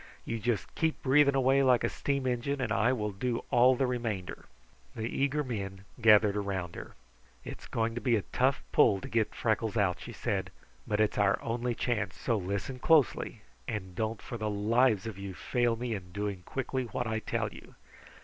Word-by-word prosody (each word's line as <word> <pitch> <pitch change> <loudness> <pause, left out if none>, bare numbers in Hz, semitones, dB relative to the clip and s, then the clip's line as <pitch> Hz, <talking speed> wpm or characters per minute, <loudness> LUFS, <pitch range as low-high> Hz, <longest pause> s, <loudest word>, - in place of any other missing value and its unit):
"You 115 - -3
just 110 -2 -2
keep 160 -1 0
breathing 140 +1 +5
away 135 +1 +4
like 130 -2 +4
a - - +3
steam 140 -2 -2
engine, 130 +3 -1
and 125 -4 -2
I 110 +5 +3
will 105 -5 -1
do 115 +4 -2
all 125 +2 +6
the 135 - +1
remainder." 115 -7 -3 0.5
The 110 0 -3
eager 140 +4 0
men 100 -6 -5 0.2
gathered 105 -2 +6
around 95 -4 -3
her. - - -9 0.5
"It's - - -8
going 115 0 -1
to 120 - -4
be 120 -3 +3
a 105 - 0
tough 60 - +2
pull 95 - +5
to - - -6
get 110 -2 0
Freckles 110 0 0
out," 95 -4 +1
she - - -8
said, - - -2 0.4
"but 105 0 0
it's 110 -1 +2
our 100 -1 +3
only 120 +1 -1
chance, 110 -7 -1
so 115 - 0
listen 100 +6 -3
closely 155 -4 +2 0.2
and 95 -4 -4
don't 110 +4 -3
for 120 - -6
the 105 0 -1
lives 110 +1 +2
of 110 -4 -6
you 100 -1 -6
fail 120 +2 0
me 120 0 -3
in 90 -4 -7
doing 100 -1 -3
quickly 130 -1 -2
what 120 +2 -3
I 110 -1 -1
tell - - -2
you. - - -14
115 Hz, 195 wpm, -30 LUFS, 100-125 Hz, 0.5 s, all